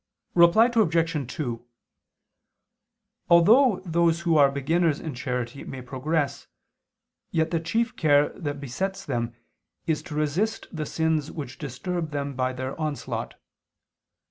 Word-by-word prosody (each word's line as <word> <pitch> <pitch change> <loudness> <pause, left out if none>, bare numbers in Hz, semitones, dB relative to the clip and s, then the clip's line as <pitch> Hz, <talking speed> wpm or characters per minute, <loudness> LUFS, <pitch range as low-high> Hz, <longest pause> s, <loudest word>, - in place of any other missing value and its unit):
Reply 170 +6 +6
Obj. 165 - +1
2: 120 -8 -4 1.7
Although 210 +6 +6
those 170 0 +2
who 170 -1 +2
are 145 -2 +6
beginners 150 +3 +1
in 155 - -5
charity 125 0 -4
may 130 -1 -7
progress, 140 +4 -2 0.8
yet 160 0 0
the 165 - +1
chief 225 +8 -1
care 145 -2 +4
that 145 -3 -5
besets 185 +9 -4
them 120 -3 -2 0.5
is 160 -2 0
to 165 -5 -8
resist 165 +9 0
the 155 -1 -3
sins 160 -2 0
which 140 -5 -7
disturb 155 +5 -4
them 140 -1 -3
by 130 0 0
their 130 +1 -5
onslaught. 155 -2 -3
155 Hz, 125 wpm, -26 LUFS, 140-170 Hz, 1.7 s, Reply